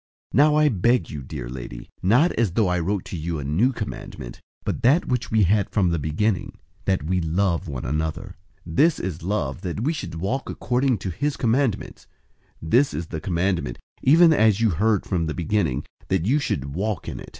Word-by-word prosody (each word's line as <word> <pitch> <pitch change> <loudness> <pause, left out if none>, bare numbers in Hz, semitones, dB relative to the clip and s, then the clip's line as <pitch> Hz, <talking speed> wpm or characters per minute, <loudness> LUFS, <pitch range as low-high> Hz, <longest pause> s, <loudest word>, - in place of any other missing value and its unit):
001:005 - - 0
Now 150 +1 +6
I 150 0 +5
beg 115 - +2
you, 75 - -5
dear 65 -2 -6
lady, - - -8
not 125 - +4
as 110 -7 0
though 110 -1 +2
I 90 0 +1
wrote 95 +3 -1
to - - -6
you 85 0 -3
a 75 - -4
new 85 - +2
commandment, 105 - -7 0.2
but - - -3
that 140 +9 +4
which 125 -2 -1
we 110 -1 +3
had 100 +3 +2
from 95 -5 +2
the 85 - 0
beginning, 90 +8 -1 0.3
that 95 -6 +1
we 90 +3 0
love 85 +2 0
one 65 -5 -5
another. 80 +4 -3 0.3
001:006 80 - -7
This 165 +1 +4
is 90 -4 -4
love, 85 -6 -2
that 95 +1 -4
we 155 +5 +1
should 90 - -6
walk 100 +11 -2
according 125 0 0
to 95 -1 -4
his 145 - -2
commandments. 125 -1 0 0.5
This 120 - +2
is 80 +2 -4
the 80 -2 -5
commandment, 85 -6 -1 0.2
even 160 +4 +6
as 110 -7 +4
you 115 -2 +3
heard 105 +5 +1
from 85 -4 -1
the 80 - -3
beginning, 80 -6 0 0.2
that 95 -3 0
you 135 +8 +3
should 70 - -2
walk 100 +1 -2
in - - -5
it. - - -10
95 Hz, 205 wpm, -24 LUFS, 80-115 Hz, 0.5 s, Now